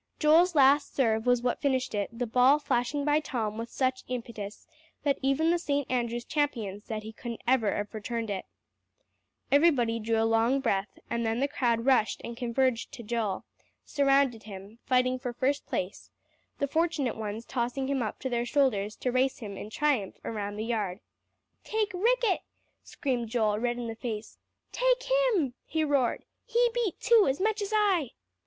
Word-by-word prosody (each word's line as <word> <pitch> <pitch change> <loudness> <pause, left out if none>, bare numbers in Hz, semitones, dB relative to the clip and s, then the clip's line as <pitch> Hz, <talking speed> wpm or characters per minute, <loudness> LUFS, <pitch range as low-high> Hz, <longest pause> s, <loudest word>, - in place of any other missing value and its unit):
Joel's 330 +3 +4
last 285 +1 +4
serve 225 -3 +1
was 245 -1 +3
what 245 - 0
finished 260 -3 0
it; 205 -1 -1
the 240 +2 -3
ball 250 +5 +5
flashing 280 0 -1
by 295 0 +3
Tom 225 -7 -3
with 230 +1 -5
such 255 -1 -1
impetus, 230 -4 -6 0.4
that 280 -2 +1
even 275 +5 +2
the 345 - +2
St. 285 -4 -1
Andrew's 240 -1 -1
champion 230 -10 -1
said 215 -1 -5
he 220 +1 -8
couldn't 235 0 -7
ever 235 -5 +3
have 205 +2 -4
returned 225 0 -3
it. 190 -2 -3 1.1
Everybody 270 -7 +4
drew 225 0 0
a 225 - +3
long 225 +4 +3
breath, 195 -5 -1
and 235 0 0
then 225 +1 0
the 280 - +2
crowd 235 -4 0
rushed 260 -5 +3
and 235 - -6
converged 245 0 0
to 235 - -8
Joel; 215 -3 -2 0.4
surrounded 275 -5 +2
him, 205 +2 -11
fighting 255 0 +2
for 250 -2 -4
first 265 +4 -1
place, 185 +2 -4 0.5
the 280 - 0
fortunate 315 -4 0
ones 220 +1 -5
tossing 260 +1 -2
him 275 -1 0
up 220 - -3
to 260 - -2
their 240 -1 0
shoulders 240 -6 +1
to 250 - -2
race 255 +1 +1
him 205 -5 -7
in 210 - -7
triumph 260 -6 0
around 205 -2 -3
the 215 +1 -3
yard. 210 -5 -2 0.6
"Take 430 -3 -1
Ricket!" 455 +1 +2 0.4
screamed 245 -4 -3
Joel, 215 -3 +1
red 240 +1 -1
in 240 - -4
the 225 -1 -5
face. 225 -2 -6 0.3
"Take - - +2
him!" - - +2
he 320 -1 -1
roared. 280 -5 +1 0.2
"He 475 0 +2
beat 475 -6 -1
too, 460 -3 +5
as 270 - -1
much 430 +2 +1
as 405 +1 -3
I." 390 - +2
250 Hz, 175 wpm, -29 LUFS, 225-285 Hz, 1.1 s, ball